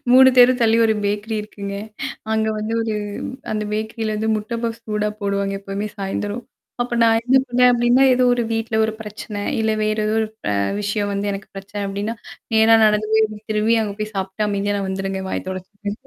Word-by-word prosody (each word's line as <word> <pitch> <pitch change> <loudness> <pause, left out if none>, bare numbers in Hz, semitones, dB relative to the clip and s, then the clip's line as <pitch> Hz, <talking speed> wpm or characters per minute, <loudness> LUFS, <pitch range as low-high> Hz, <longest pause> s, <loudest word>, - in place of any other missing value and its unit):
3 260 +1 +9
தெரு 250 +1 +8
தள்ளி 225 0 +4
ஒரு 220 - +2
பேக்கரி 205 +2 -1
இருக்குங்க. 200 -1 -7 0.6
அங்க 220 0 +1
வந்து 215 +2 -2
ஒரு 220 -1 -2 0.6
அந்த 215 0 -1
பேக்கரிலருந்து 220 0 -2
முட்டை 215 +2 -4
பஃப்ஸ் 230 0 -3
சூடா 210 0 0
போடுவாங்க. 200 0 0
எப்பவுமே 200 +1 -4
சாயந்தரம். 205 +3 -3 0.4
அப்ப 245 0 -3
நான் 225 0 +4
என்ன 255 +2 +4
பண்ணேன் 250 +1 +5
அப்ப்டின்னா, 240 +2 +4
ஏதோ 255 0 +3
ஒரு 240 - 0
வீட்ல 225 0 -1
ஒரு 220 - -1
பிரச்சனை, 210 -1 -7 0.2
இல்ல 220 - +1
வேறு 215 0 0
ஏதோ 215 - 0
ஒரு 220 - -1 0.2
ப - - -1 0.3
விஷயம் 205 0 -1
வந்து 200 +1 -1
எனக்கு 195 0 -7
பிரச்சனை 205 +1 -6
அப்ப்டின்னா, 200 +3 -3 0.4
ந 220 - +5
நா - - +9
நடந்து 215 0 +1
போய் 220 0 +5 0.3
திரும்பி 215 +2 +2
அங்க 205 -2 -3
போய் 215 0 -3
சாப்ட்டு 190 +2 -2
அமைதியா 205 0 0
நான் 195 -1 -3
வந்துருங்கேன். 190 0 -3
வாய் - - -3
தொடச்சுட்டு. 200 +3 -6
215 Hz, 185 wpm, -21 LUFS, 200-225 Hz, 0.6 s, 3